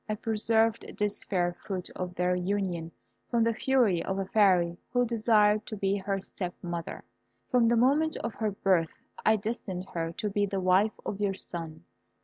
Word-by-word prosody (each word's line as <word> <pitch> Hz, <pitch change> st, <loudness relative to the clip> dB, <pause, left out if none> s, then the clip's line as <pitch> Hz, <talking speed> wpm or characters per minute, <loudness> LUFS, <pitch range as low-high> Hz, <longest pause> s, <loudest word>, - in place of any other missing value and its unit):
I 215 Hz, -, 0 dB
preserved 225 Hz, +1 st, +1 dB
this 210 Hz, 0 st, -1 dB
fair 175 Hz, -3 st, 0 dB
fruit 185 Hz, -3 st, -5 dB
of 180 Hz, -1 st, -5 dB
their 180 Hz, +1 st, +1 dB
union 180 Hz, -3 st, -2 dB, 0.4 s
from 235 Hz, -2 st, +2 dB
the 230 Hz, 0 st, +2 dB
fury 230 Hz, -8 st, +2 dB
of 190 Hz, -, -2 dB
a 195 Hz, -, -1 dB
Fairy 180 Hz, -4 st, +3 dB
who 245 Hz, 0 st, +2 dB
desired 215 Hz, -2 st, +3 dB
to 215 Hz, -, -5 dB
be 195 Hz, 0 st, +1 dB
her 195 Hz, 0 st, -2 dB
step 180 Hz, -2 st, -5 dB
mother. 170 Hz, -1 st, -5 dB, 0.5 s
From 245 Hz, -3 st, +4 dB
the 235 Hz, +1 st, +3 dB
moment 290 Hz, +6 st, +3 dB
of 230 Hz, -, -4 dB
her 220 Hz, -2 st, -1 dB
birth 185 Hz, -4 st, 0 dB, 0.2 s
I 220 Hz, -, +5 dB
destined 200 Hz, -4 st, -4 dB
her 165 Hz, -1 st, -2 dB
to 210 Hz, -, -3 dB
be 205 Hz, 0 st, 0 dB
the 195 Hz, 0 st, -2 dB
wife 190 Hz, +4 st, +2 dB
of 200 Hz, -, -4 dB
your 200 Hz, -2 st, +1 dB
son. 165 Hz, -3 st, -7 dB
200 Hz, 180 wpm, -29 LUFS, 180-220 Hz, 0.5 s, I